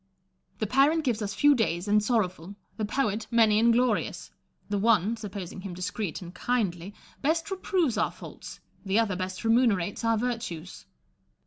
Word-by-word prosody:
The 215 Hz, -, -1 dB
parent 280 Hz, +8 st, +3 dB
gives 235 Hz, -5 st, 0 dB
us 205 Hz, 0 st, -3 dB
few 290 Hz, 0 st, +5 dB
days 195 Hz, -7 st, 0 dB
and 210 Hz, +1 st, +4 dB
sorrowful; 200 Hz, -5 st, -1 dB, 0.2 s
tlie 215 Hz, -, -1 dB
poet, 215 Hz, -2 st, -1 dB
many 220 Hz, -3 st, +4 dB
and 235 Hz, +1 st, +5 dB
glorious: 235 Hz, -2 st, 0 dB, 0.4 s
the 205 Hz, -1 st, -1 dB
one 215 Hz, 0 st, +3 dB
(supposing 200 Hz, -4 st, -7 dB
him 185 Hz, -2 st, -7 dB
discreet 180 Hz, +1 st, -4 dB
and 175 Hz, 0 st, -10 dB
kindly) 195 Hz, -4 st, -2 dB, 0.3 s
best 325 Hz, +5 st, 0 dB
reproves 360 Hz, -, 0 dB
our 215 Hz, -, +2 dB
faults; -, -, -11 dB, 0.2 s
the 195 Hz, +1 st, 0 dB
other 220 Hz, -5 st, +2 dB
best 185 Hz, +2 st, -4 dB
remunerates 225 Hz, -5 st, +2 dB
our 230 Hz, -1 st, +2 dB
virtues. 185 Hz, -, -4 dB
215 Hz, 155 wpm, -27 LUFS, 190-240 Hz, 0.4 s, few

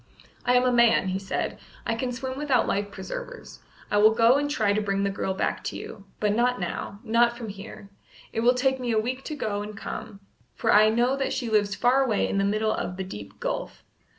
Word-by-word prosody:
"I 250 Hz, +1 st, +4 dB
am 250 Hz, -, +5 dB
a 255 Hz, -, +3 dB
man," 235 Hz, -5 st, +4 dB
he 185 Hz, +1 st, -1 dB
said. 195 Hz, -, -3 dB, 0.3 s
"I -, -, 0 dB
can 245 Hz, +2 st, -2 dB
swim 260 Hz, +1 st, -4 dB
without 275 Hz, -3 st, +1 dB
life 200 Hz, +1 st, -1 dB
preservers. -, -, -8 dB, 0.3 s
I 205 Hz, -, +3 dB
will 215 Hz, +1 st, +6 dB
go 235 Hz, +3 st, +5 dB
and 290 Hz, 0 st, -1 dB
try 215 Hz, -8 st, +1 dB
to 215 Hz, -, +1 dB
bring 195 Hz, -1 st, 0 dB
the 200 Hz, -, +1 dB
girl 190 Hz, -1 st, -2 dB
back -, -, -1 dB
to -, -, -3 dB
you. 200 Hz, -, -9 dB
But 210 Hz, -1 st, +1 dB
not 245 Hz, +2 st, +2 dB
now, 195 Hz, +2 st, -4 dB
not 235 Hz, +1 st, +3 dB
from 230 Hz, -3 st, -6 dB
here; 200 Hz, 0 st, -10 dB, 0.4 s
it -, -, -1 dB
will 245 Hz, +2 st, +4 dB
take 265 Hz, +1 st, +1 dB
me 245 Hz, -2 st, -2 dB
a 220 Hz, -, +3 dB
week 255 Hz, +4 st, -3 dB
to 305 Hz, -, -4 dB
go 210 Hz, -7 st, -2 dB
and 210 Hz, 0 st, -7 dB
come, 200 Hz, -1 st, -7 dB, 0.3 s
for -, -, +2 dB
I 215 Hz, +1 st, +7 dB
know 240 Hz, +4 st, +2 dB
that 270 Hz, -, -1 dB
she 240 Hz, -4 st, -3 dB
lives 205 Hz, -2 st, +2 dB
far 255 Hz, +5 st, +3 dB
away 225 Hz, -6 st, +1 dB
in 195 Hz, -, -1 dB
the -, -, +2 dB
middle 215 Hz, +2 st, +1 dB
of 180 Hz, -, -4 dB
the 190 Hz, -, -2 dB
deep 105 Hz, -, -9 dB
gulf. -, -, -4 dB
225 Hz, 235 wpm, -26 LUFS, 205-250 Hz, 0.4 s, I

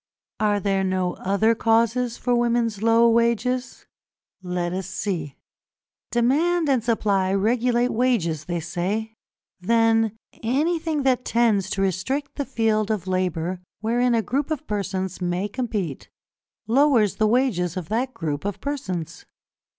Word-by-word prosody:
Are 210 Hz, -1 st, +2 dB
there 195 Hz, -1 st, 0 dB
no 185 Hz, -1 st, 0 dB
other 200 Hz, +4 st, +2 dB
causes 230 Hz, +2 st, +1 dB
for 245 Hz, -, 0 dB
women's 235 Hz, -3 st, +1 dB
low 230 Hz, +1 st, +5 dB
wages? 235 Hz, +2 st, 0 dB, 0.6 s
Let 180 Hz, -1 st, -2 dB
us 190 Hz, 0 st, -3 dB
see. 175 Hz, -7 st, -3 dB, 0.7 s
Demand 305 Hz, +8 st, +2 dB
and 260 Hz, -5 st, +2 dB
Supply 200 Hz, -5 st, +1 dB
regulate 240 Hz, +4 st, +2 dB
wages, 195 Hz, -, 0 dB
they 175 Hz, 0 st, -2 dB
say. 200 Hz, +7 st, -3 dB, 0.5 s
Then 225 Hz, +2 st, +2 dB, 0.2 s
anything 310 Hz, +5 st, 0 dB
that 255 Hz, -2 st, +2 dB
tends 220 Hz, -5 st, +2 dB
to 195 Hz, 0 st, -1 dB
restrict 260 Hz, -, -2 dB
the 285 Hz, -, -3 dB
field 220 Hz, -4 st, 0 dB
of 210 Hz, -5 st, -1 dB
labour 185 Hz, -1 st, -1 dB, 0.2 s
wherein 240 Hz, +2 st, +2 dB
a 225 Hz, -, +1 dB
group 270 Hz, -, -1 dB
of 310 Hz, -4 st, -3 dB
persons 190 Hz, -3 st, -3 dB
may 180 Hz, +3 st, -1 dB
compete, 210 Hz, -, -4 dB, 0.6 s
lowers 240 Hz, -3 st, +3 dB
the 215 Hz, -, +3 dB
wages 210 Hz, -, +1 dB
of 175 Hz, -3 st, -5 dB
that 245 Hz, +4 st, 0 dB
group 150 Hz, -3 st, -3 dB
of 200 Hz, -1 st, -3 dB
persons. 180 Hz, -, -4 dB
220 Hz, 135 wpm, -23 LUFS, 185-245 Hz, 0.7 s, low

